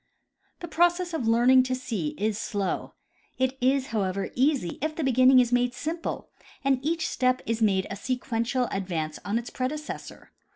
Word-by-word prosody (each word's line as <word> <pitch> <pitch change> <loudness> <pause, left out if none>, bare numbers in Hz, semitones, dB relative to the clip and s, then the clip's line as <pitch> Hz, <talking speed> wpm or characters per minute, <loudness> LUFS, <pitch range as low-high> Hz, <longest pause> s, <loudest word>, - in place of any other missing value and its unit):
The 345 - -5
process 345 +1 +2
of 255 -8 -1
learning 245 +3 +6
to 255 0 -1
see 215 -12 -3
is 215 +1 0
slow. 200 -2 -3 0.4
It 260 +1 0
is, 265 +1 +2
however, 195 -2 -1
easy 260 - +1
if 310 +1 -2
the 320 - -2
beginning 255 0 +6
is 245 -1 +2
made 245 0 +2
simple 330 +4 -4 0.3
and 270 -1 +1
each 320 +1 0
step 255 0 +1
is 230 0 -2
made 195 -3 +3
a - - -3
sequential 245 +2 -1
advance 170 -6 -3
on 205 +3 -1
its 235 0 -5
predecessor. 300 +4 -5
255 Hz, 165 wpm, -26 LUFS, 215-275 Hz, 0.4 s, learning